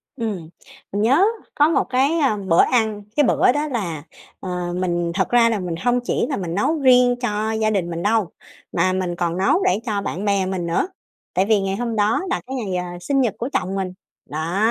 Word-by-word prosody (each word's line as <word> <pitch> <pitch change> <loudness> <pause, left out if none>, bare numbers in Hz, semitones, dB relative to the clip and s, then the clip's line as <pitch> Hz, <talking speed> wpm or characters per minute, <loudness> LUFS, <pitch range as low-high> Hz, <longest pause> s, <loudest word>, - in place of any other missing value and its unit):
Ừm. 205 -10 -4 0.4
Mình 205 - -1
nhớ 265 - +4 0.3
có 295 +1 +4
một 330 - +2
cái, 275 +6 +2
ừm, 215 -9 0
bữa 165 - +6
ăn, 220 -4 +1
cái 295 - +4
bữa 245 - +4
đó 295 +3 -1
là, 175 - -3 0.4
ờ, 180 -1 -4
mình 175 -2 -1
thật 190 - 0
ra 235 -1 +5
là 220 -3 0
mình 180 -2 -3
hông 245 0 +2
chỉ - - 0
là 275 - -1
mình 175 -3 -4
nấu 305 +10 +1
riêng 250 -2 +5
cho 215 -1 -1
gia 220 -1 +1
đình 190 -5 -1
mình 170 0 -4
đâu 215 -3 +2 0.4
mà 185 +2 +1
mình 180 -2 -2
còn 170 0 -1
nấu 195 - +2
để 370 - +2
cho 210 -4 -1
bạn 195 0 -4
bè 200 -2 +2
mình 185 -2 -3
nữa 170 - 0 0.5
tại 185 - +2
vì 210 -1 +3
ngày 195 0 -1
hôm 235 +1 -3
đó 210 - +2
là 370 - -1
cái 265 - -4
ngày, 205 -7 -3
ờ, 175 -1 -4
sinh 275 +6 +1
nhật 235 -5 +1
của 245 +4 -3
chồng 190 +2 -1
mình. 190 -2 -3 0.3
Đó. 160 +5 -3
205 Hz, 225 wpm, -21 LUFS, 180-245 Hz, 0.5 s, bữa